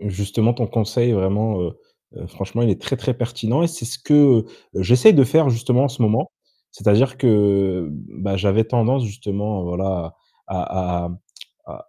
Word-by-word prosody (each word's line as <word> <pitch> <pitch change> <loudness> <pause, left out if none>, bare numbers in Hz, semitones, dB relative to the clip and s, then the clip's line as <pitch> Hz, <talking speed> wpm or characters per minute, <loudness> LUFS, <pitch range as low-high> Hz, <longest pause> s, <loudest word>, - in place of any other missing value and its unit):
Justement, 105 +3 -1
ton 120 -2 -2
conseil 115 +2 0
est - - +2
vraiment, 100 +1 0
heu 85 -2 -3 0.4
heu, - - -10
franchement, 95 +4 -5
il 115 - +3
est 95 - -2
très, 135 - -3
très 125 +1 -2
pertinent 120 +3 -2
et 170 - +2
c'est 165 -7 -8
ce 125 +3 -6
que 135 -4 +5 0.3
j'essaie 125 - +5
de 140 - +6
faire 150 +4 +3
justement 125 +2 +1
en - - +1
ce 120 - -4
moment. 110 0 0 0.4
C'est-à-dire 125 +6 +2
que, 135 - 0
heu, 100 -5 +2
bah, 95 +6 -6
j'avais 100 +3 +1
tendance 120 +3 0
justement, 105 -2 -4
voilà 90 -1 -4 0.3
à 90 -1 -3
à - - -7 0.6
à - - -13
110 Hz, 175 wpm, -20 LUFS, 95-125 Hz, 0.6 s, de